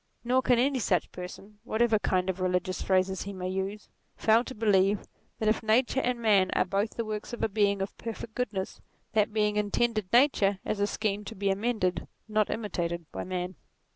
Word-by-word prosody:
Nor 250 +2 +3
can 250 -1 +3
any 265 +2 +2
such 180 -7 0
person, 195 +3 -9
whatever 225 -2 +2
kind 185 -2 +1
of 190 0 -2
religious 185 0 0
phrases 190 0 +1
he 200 - -5
may 185 -1 -4
use, 190 +2 -3 0.3
fail 225 +2 +4
to 260 - -7
believe, 205 -2 +3 0.3
that 220 - -1
if 215 - +2
Nature 240 +4 +2
and 250 -1 -1
Man 205 -5 +4
are - - +2
both 200 +4 -1
the 230 - -2
works 215 +2 -5
of 240 - -4
a - - +4
Being 200 -2 +1
of 195 - -6
perfect 225 0 -6
good 250 -3 -1
ness, 190 -2 -5 0.3
that 215 -1 +2
Being 210 -1 +1
intended 210 -1 0
Nature 235 -6 +4
as 215 - -2
a 205 - +2
scheme 210 -1 -1
to 225 - -7
be 195 0 0
amended, 200 -3 -1 0.2
not 215 -1 +1
imitated, 170 -6 -3
by - - -4
Man. 180 0 -3
210 Hz, 200 wpm, -29 LUFS, 190-225 Hz, 0.3 s, fail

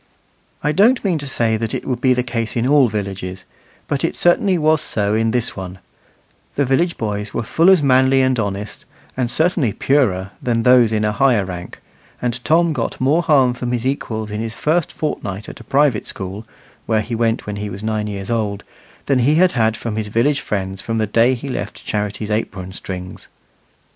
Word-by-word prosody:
I 150 - +2
don't 220 +8 +3
mean 175 -5 +1
to 140 - -3
say 115 -4 +1
it 110 0 -2
would 125 -2 -2
be 130 -1 +4
the 125 - 0
case 115 -3 -3
in 120 0 0
all 140 -2 +5
villages, 95 -3 -5 0.4
but 140 -2 -2
it 165 - 0
certainly 180 +2 +3
was 155 -1 +3
so 105 -6 -1
in 115 +1 +2
this 120 0 0
one: 95 -1 -7 0.8
the 140 - +1
village 170 +7 +1
boys 105 -1 -4
were - - -1
full 165 +10 +3
as 185 -6 +5
manly 130 0 +4
and 130 -2 +1
honest, 100 -1 -4 0.3
and 125 -2 -1
certainly 155 - +1
purer, 100 -9 +1
than 115 -2 0
those 125 -2 +5
in 110 -1 +1
a 105 - +1
higher 120 -4 +2
rank; 90 -1 -8 0.4
and 125 0 -3
Tom 165 +1 +3
got - - -3
more 145 +6 +3
harm 135 -7 +3
from 125 0 -4
his 120 0 -2
equals 110 -5 -2
in 105 +1 -3
his 115 0 -4
first 160 +4 0
fortnight 105 -9 -4
at - - -9
a - - -11
private 140 -5 +1
school, 100 +3 -6 0.4
where 110 -2 +2
he 115 +3 -6
went 115 0 0
when 105 -1 -5
he 105 0 -4
was 100 +1 -8
nine 110 -1 -1
years 100 0 -5
old, 105 -3 -1 0.4
than 135 -2 +2
he 140 +5 +3
had 120 -11 +3
from 110 -2 -4
his 110 -1 -2
village 130 +7 +1
friends 95 -5 -3
from 115 -1 -3
the 110 - +1
day 115 +5 +3
he 125 +3 -7
left 130 - -5
Charity's 105 0 -3
apron 95 -4 -3
strings. 90 -1 -7
115 Hz, 200 wpm, -19 LUFS, 105-135 Hz, 0.8 s, all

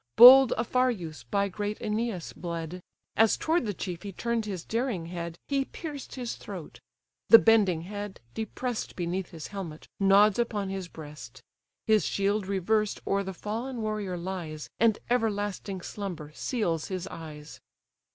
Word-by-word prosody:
Bold 255 +1 +11
Aphareus 220 - 0
by 200 0 +2
great 205 +2 -3
Æneas 215 -4 -3
bled; 170 0 -5 0.3
As 225 0 +4
toward 320 -6 +1
the 205 - -1
chief 175 -2 -5
he 200 - -6
turn'd 235 +3 -1
his 185 -5 -5
daring 225 -7 -1
head, 170 -1 -5
He 275 -1 +1
pierced 295 -3 -7
his 245 -3 -4
throat; 185 -6 -8 0.5
the 230 - +12
bending 210 -8 +4
head, 205 +2 -6
depress'd 225 +2 -4
Beneath 175 +1 -2
his 160 -2 -8
helmet, 170 -6 -6
nods 200 +2 +5
upon 210 -4 -1
his 190 -2 -4
breast; 145 -7 -11 0.4
His 215 -1 +4
shield 200 0 0
reversed 205 +2 +1
o'er 200 0 +1
the 190 -1 -4
fallen 225 +6 -4
warrior 210 -4 -2
lies, 170 -4 -5
And 225 -2 +4
everlasting 205 -4 -1
slumber 175 -7 -6
seals 170 - -1
his 185 -2 -4
eyes. 155 -2 -9
200 Hz, 145 wpm, -28 LUFS, 175-225 Hz, 0.5 s, the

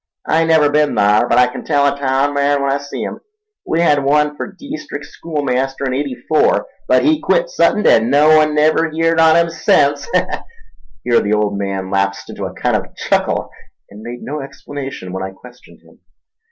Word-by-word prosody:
I 165 +1 +2
never 160 -3 +3
ben 150 0 +1
thar, 105 +3 +3
but - - +3
I 125 - +6
kin 125 - -7
tell 145 -2 +1
a 140 0 +1
taown 140 +1 0
man 140 0 +1
when 140 - 0
I 140 - 0
see 140 0 -6
'im—we 425 - -6
hed 145 -4 +2
one 150 +1 +2
fer - - -5
deestrick 280 - -8
schoolmaster 135 -4 -3
in 130 - -1
'eighty 135 -1 -3
four, 155 - +2 0.2
but - - +3
he 310 0 +3
quit - - +1
suddent 215 - +2
an' 115 - +4
no 150 +3 +5
one 155 -1 +3
never 155 +2 +2
heerd 165 +1 0
on 160 0 +5
'im 170 0 +2
sence—" 165 -5 +1 1.0
Here 120 -1 +3
the 105 - -1
old 105 -1 0
man 95 -1 -4
lapsed 100 0 -1
into - - -6
a - - -6
kind - - 0
of - - -4
chuckle, - - -1 0.4
and 105 +1 -12
made 120 +2 -8
no 150 +1 -5
explanation 135 -7 -8
when 95 - -4
I 95 0 -5
questioned 125 +5 -17
him. - - -22
145 Hz, 195 wpm, -17 LUFS, 125-160 Hz, 1.0 s, I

